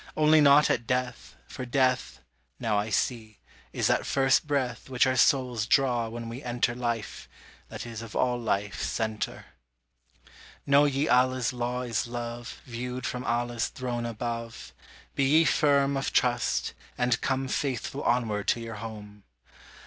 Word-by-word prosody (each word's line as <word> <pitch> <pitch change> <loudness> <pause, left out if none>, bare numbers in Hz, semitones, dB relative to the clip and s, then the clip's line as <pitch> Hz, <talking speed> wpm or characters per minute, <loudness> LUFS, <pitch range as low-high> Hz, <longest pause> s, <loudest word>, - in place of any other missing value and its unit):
Only 155 0 +5
not 145 +1 +6
at 115 -1 -1
death, 125 -1 -2
for 130 - -7
death 125 - 0 0.4
Now 115 -4 0
I 105 +2 -2
see 110 0 -1 0.3
is - - -2
that - - +2
first 135 +2 +2
breath 135 -3 -2
Which 125 -1 +3
our 130 0 +1
souls 125 -4 +2
draw 120 -4 +2
when 115 0 -6
we 115 +3 -7
enter 120 -2 0
Life, 120 -3 -4 0.4
that - - -7
is 115 -2 -7
of 115 -2 -9
all 125 -1 +1
life 100 -5 -2
center. 110 -2 -3 1.2
Know 140 +1 +5
ye 140 +1 0
Allah's 125 -1 +2
law 125 +1 -2
is 115 -2 -2
love, 120 0 -6
Viewed 125 +1 -5
from 125 -1 -3
Allah's 120 0 -1
Throne 120 -2 -4
above; 115 0 -5 0.4
Be 140 - +1
ye 165 - +5
firm 140 -2 +3
of 135 - -1
trust, 120 -2 +1 0.2
and 125 -1 +1
come 135 0 -1
Faithful 135 +1 -2
onward 110 -4 0
to - - +2
your 115 -1 -7
home! 105 -2 -9
120 Hz, 150 wpm, -27 LUFS, 115-130 Hz, 1.2 s, not